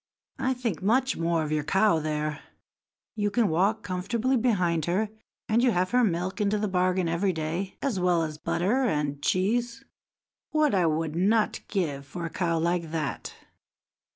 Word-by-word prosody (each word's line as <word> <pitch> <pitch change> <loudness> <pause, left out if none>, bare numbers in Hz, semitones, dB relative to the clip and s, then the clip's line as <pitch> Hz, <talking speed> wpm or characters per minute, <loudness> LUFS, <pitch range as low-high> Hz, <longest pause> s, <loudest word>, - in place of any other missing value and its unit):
I 260 0 0
think 235 -9 -3
much 255 +7 +2
more 165 -1 0
of 150 - -4
your 155 -1 0
cow 190 +2 +3
there. 150 0 -2 0.8
You 205 -1 0
can 220 0 +2
walk 190 +7 +1
comfortably 220 +8 -1
behind 180 - +1
her, 195 +5 0 0.4
and 225 +2 +3
you 250 - +4
have 185 -3 0
her 250 0 +4
milk 185 +1 -1
into 210 +1 +2
the 210 0 -1
bargain 185 -1 +1
every 175 +3 +1
day, 165 +4 -3
as 255 -9 0
well 180 -2 +2
as 155 -1 -5
butter 205 +13 0
and 150 - -1
cheese. 230 +9 0 0.6
What 305 -4 +2
would 165 -4 +2
I 165 - -2
not 215 +4 +2
give 145 -9 -2
for 170 +3 -5
a 165 - -5
cow 170 -1 0
like 170 0 0
that!" 155 -3 -4
185 Hz, 170 wpm, -27 LUFS, 165-220 Hz, 0.8 s, you